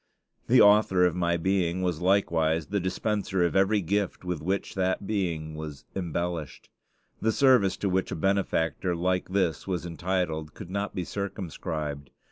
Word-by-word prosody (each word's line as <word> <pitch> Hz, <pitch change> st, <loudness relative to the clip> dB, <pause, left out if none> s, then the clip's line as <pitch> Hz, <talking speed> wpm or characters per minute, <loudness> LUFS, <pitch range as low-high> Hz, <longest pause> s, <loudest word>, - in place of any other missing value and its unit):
The -, -, +6 dB
Author 105 Hz, -3 st, +5 dB
of 90 Hz, -1 st, +1 dB
my 85 Hz, -1 st, +1 dB
being 95 Hz, 0 st, 0 dB
was 90 Hz, -3 st, -1 dB
likewise 85 Hz, -4 st, +2 dB
the 100 Hz, 0 st, 0 dB
dispenser 95 Hz, 0 st, 0 dB
of 85 Hz, -, -1 dB
every 100 Hz, +2 st, +3 dB
gift 100 Hz, +1 st, -1 dB
with 90 Hz, -4 st, -3 dB
which 95 Hz, +5 st, -2 dB
that 95 Hz, +1 st, -1 dB
being 85 Hz, -7 st, -2 dB
was 75 Hz, -2 st, -8 dB
embellished. 85 Hz, -4 st, -4 dB, 0.5 s
The 110 Hz, -, +2 dB
service 125 Hz, -7 st, +4 dB
to 100 Hz, -, -1 dB
which 95 Hz, 0 st, 0 dB
a -, -, -2 dB
benefactor 90 Hz, -2 st, 0 dB
like 90 Hz, +2 st, 0 dB
this 95 Hz, -4 st, 0 dB
was 90 Hz, -2 st, -2 dB
entitled 85 Hz, -2 st, -2 dB
could 90 Hz, -, -9 dB
not 100 Hz, +1 st, -3 dB
be 90 Hz, -, -2 dB
circumscribed. 80 Hz, -7 st, -4 dB
90 Hz, 155 wpm, -27 LUFS, 80-95 Hz, 0.5 s, The